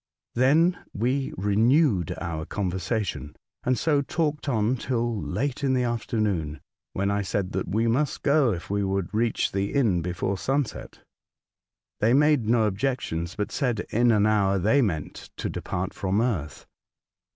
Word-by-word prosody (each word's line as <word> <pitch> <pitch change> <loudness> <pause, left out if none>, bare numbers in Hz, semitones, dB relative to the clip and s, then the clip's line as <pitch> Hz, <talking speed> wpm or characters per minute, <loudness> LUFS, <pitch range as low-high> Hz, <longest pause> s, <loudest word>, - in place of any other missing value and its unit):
Then 160 +8 +3
we 130 +5 -1
re 100 +2 0
newed 115 - +3
our 80 -2 -4
conversation, 95 - -3 0.3
and 125 0 +1
so 150 -3 +2
talked 150 0 -2
on 110 0 +1
till 120 -3 -2
late 135 +8 -2
in 130 -1 +2
the 125 - +1
afternoon, 105 -10 -1 0.3
when 100 +1 0
I 100 0 0
said 95 -1 -2
that - - -2
we 110 +5 0
must 130 +5 0
go 140 -4 +4
if 90 -3 -5
we 100 0 -1
would 95 -1 -2
reach 115 +1 +1
the 100 +4 -2
inn 110 -11 +2
before 90 +2 -2
sunset. 135 - -2 1.0
They 110 +3 +3
made 145 -6 +3
no 115 -1 +4
objections, 95 -6 -2
but 105 - -3
said 120 -7 -1
in 120 +2 +3
an 105 -2 +4
hour 100 -2 +2
they 110 +9 +3
meant 80 - -3
to - - -3
depart - - -4
from 95 +1 -1
earth. 85 - -2
110 Hz, 155 wpm, -26 LUFS, 95-130 Hz, 1.0 s, go